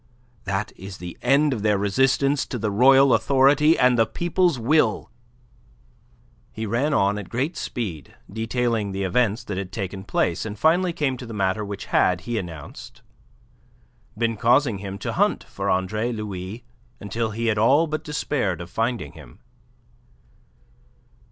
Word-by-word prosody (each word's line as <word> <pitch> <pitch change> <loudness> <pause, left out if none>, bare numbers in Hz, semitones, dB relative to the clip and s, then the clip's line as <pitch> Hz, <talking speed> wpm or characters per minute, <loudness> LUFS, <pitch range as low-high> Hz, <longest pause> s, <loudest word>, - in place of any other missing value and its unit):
That 100 +1 -2
is 95 0 -9
the 90 -1 -8
end 140 +3 +3
of 115 - -4
their 105 -1 +2
resistance 135 +7 +1
to 125 - -4
the 105 -2 -2
royal 135 +4 +6
authority 140 +6 +4
and 125 -1 +3
the 115 - +4
people's 175 -2 0
will." 120 -1 +1 1.4
He 110 - -5
ran 120 +8 0
on 100 -6 +2
at 100 - -9
great 135 +8 -2
speed 90 - -5
detailing 110 -1 -1
the 95 0 -2
events 105 +3 +1
that 95 -2 -4
had 95 -2 -6
taken 95 -2 -5
place, 90 -2 -1
and 110 -1 -6
finally 175 - +3
came 145 -6 -1
to 125 - -9
the 115 - -7
matter 95 +1 0
which 100 -1 -6
had, 90 -1 +3
he 120 -2 -2
announced, 80 - -9 1.1
been 115 -1 0
causing 120 -1 +2
him 100 -1 -6
to 100 - -4
hunt - - +1
for - - -4
Andre 105 +6 0
Louis 105 0 -6 0.4
until 110 +3 -3
he 115 +2 -4
had 110 -2 +1
all 140 +9 +4
but 155 -1 -4
despaired 135 - -2
of 85 0 -9
finding 115 - -2
him. - - -14
110 Hz, 155 wpm, -23 LUFS, 100-130 Hz, 1.4 s, royal